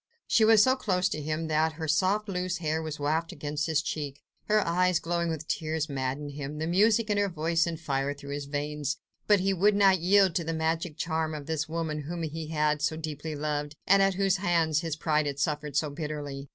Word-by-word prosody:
She 225 - +3
was 220 -1 +7
so 260 0 +4
close 185 -7 +1
to 150 - -3
him 155 +2 -2
that 160 +1 +1
her 160 0 -5
soft, 190 +7 +2
loose 180 -1 -2
hair 160 -1 -1
was 155 -2 -5
wafted 155 +3 -1
against 150 +1 -2
his 155 -2 +1
cheek; 145 -4 -5 0.2
her 215 -1 +2
eyes, 180 +1 +2
glowing 170 0 -1
with 160 -1 -4
tears, 155 -1 -2
maddened 135 +1 -3
him, 145 +1 -6
the 155 - -2
music 210 +5 +3
in 205 - +2
her 200 -1 +1
voice 165 0 0
sent 165 -2 -4
fire 140 -1 -1
through 140 0 -8
his 145 0 -4
veins. 145 0 -3 0.3
But 205 -3 +5
he 195 +1 +2
would 200 +3 +3
not 195 -2 +5
yield 190 +1 +4
to 170 - -1
the 165 +1 -3
magic 160 0 -1
charm 160 -1 -1
of 145 -2 -7
this 155 0 -2
woman 160 -2 -2
whom 170 0 -4
he 160 0 -4
had 150 -1 0
so 155 +1 0
deeply 155 0 -5
loved, 150 0 -3
and 195 +1 +5
at 195 -1 +3
whose 195 0 +2
hands 165 -5 +2
his 165 -2 -3
pride 155 -1 +1
had 140 -1 -3
suffered 150 -2 -2
so 150 -1 0
bitterly. 145 -2 -5
160 Hz, 220 wpm, -28 LUFS, 150-180 Hz, 0.3 s, was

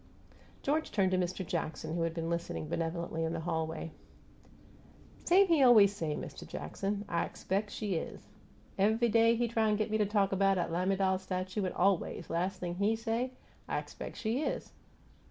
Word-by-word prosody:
George 310 +3 0
turned 195 -3 +2
to 185 - +2
Mist' 185 +1 -2
Jackson, 160 -2 -3
who 170 - -1
had 165 0 -1
been 165 -1 -2
listening 170 -2 -3
benevolently 165 0 -2
in 160 0 -1
the 165 - -3
hallway. 160 -1 -3 1.3
"Same 380 +3 +6
he 330 -5 +4
aw 255 - +8
ways 205 -4 +7
say, 160 -6 -2
Mist' - - -7
Jackson 200 - -3
'I 170 -3 0
expec' 200 +2 -2
she 205 -1 -3
is!' - - -6 0.5
Ev'y 220 +4 +3
day 230 +1 +5
he 240 +1 +1
try 225 -1 +1
t' 210 - +2
git 215 0 -1
me 215 - +1
talk 205 -1 +2
'bout 195 0 +3
'at 175 -2 -1
lamiDAL 190 +2 +1
statue, 185 +2 -3
an' - - -4
aw 195 +2 +4
ways, 170 -1 -6
las' 180 +3 -1
thing 175 -1 -4
HE 205 +3 +2
say, 225 +3 -1 0.4
'I - - 0
expec' - - -6
she 235 +4 -1
is!' - - -3
195 Hz, 185 wpm, -32 LUFS, 170-220 Hz, 1.3 s, aw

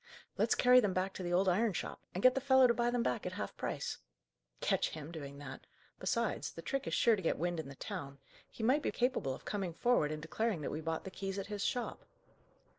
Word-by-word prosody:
"Let's - - +2
carry 250 0 +7
them 205 -6 +1
back 185 +1 0
to - - -6
the 175 -1 -3
old 185 +2 +3
iron 205 +4 +3
shop, - - -4
and 185 - -2
get 255 - +8
the 270 - -1
fellow 265 -1 +6
to 240 - +5
buy 240 0 +1
them 240 -1 +1
back 125 - -1
at - - -4
half - - -4
price!" - - -3 0.6
"Catch - - +1
him 155 0 -7
doing 140 -4 -7
that! 135 -2 -9 0.3
Besides, - - -1
the - - -8
trick 275 -1 -2
is - - 0
sure 230 -2 +5
to 195 - -5
get 165 - +1
wind 175 0 -1
in 155 - -5
the 140 - -9
town; 140 -6 -6 0.3
he 225 - -7
might 265 +6 +4
be - - 0
capable 240 - 0
of - - -15
coming 190 -5 -3
forward 205 -9 +2
and 155 - -3
declaring 190 +3 -1
that - - -3
we 155 - -3
bought 160 0 -2
the 190 - -7
keys 195 0 -4
at 195 - -3
his 205 - -2
shop." 245 -1 -2
190 Hz, 245 wpm, -34 LUFS, 160-240 Hz, 0.6 s, get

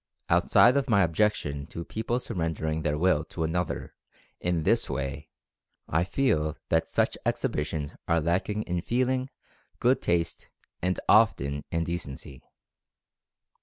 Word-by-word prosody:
Outside 125 +3 +5
of 140 -1 0
my 100 -3 +5
objection 80 -5 0
to 85 - -7
people 115 +2 -2
surrender 80 -10 -3
ing 80 0 -1
their 75 -1 0
Will 80 -2 +3
to 80 - -4
another 85 +2 -2 0.5
in 85 -2 0
this - - +2
way 70 +3 -4 0.6
I 80 +3 +1
feel 80 - +1
that. 80 -1 +2
such - - 0
exhibitions 75 -1 -2
are 85 - +3
lacking 95 +6 0
in 90 0 -2
feeling, 130 +4 0 0.5
good 125 +2 +3
taste 85 -1 -1 0.3
and 90 +1 0
often 75 -10 +3
in 85 0 0
decency. 70 -6 -6
85 Hz, 130 wpm, -27 LUFS, 75-105 Hz, 0.6 s, Outside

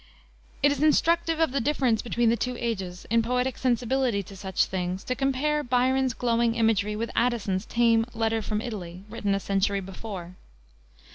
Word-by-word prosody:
It 290 - +6
is 285 -1 -2
instructive 330 +1 +3
of 325 -4 +2
the 275 0 0
difference 255 -4 +1
between 235 -1 +1
the - - +3
two 250 +1 -2
ages, 190 -7 -4
in 230 0 +4
poetic 250 +2 0
sensibility 245 -3 0
to 195 - -12
such 190 0 0
things, 185 +1 -3
to 255 - -1
compare 275 +3 0
Byron's 255 0 +1
glowing 235 -1 +1
imagery 215 -2 +1
with 230 +2 -3
Addison's 215 -5 0
tame 230 -1 +3
Letter 225 0 0
from 215 0 -2
Italy, 190 -6 -6
written 205 -3 -1
a - - -1
century 200 +1 0
before. 190 -2 -7
230 Hz, 165 wpm, -26 LUFS, 200-255 Hz, -, It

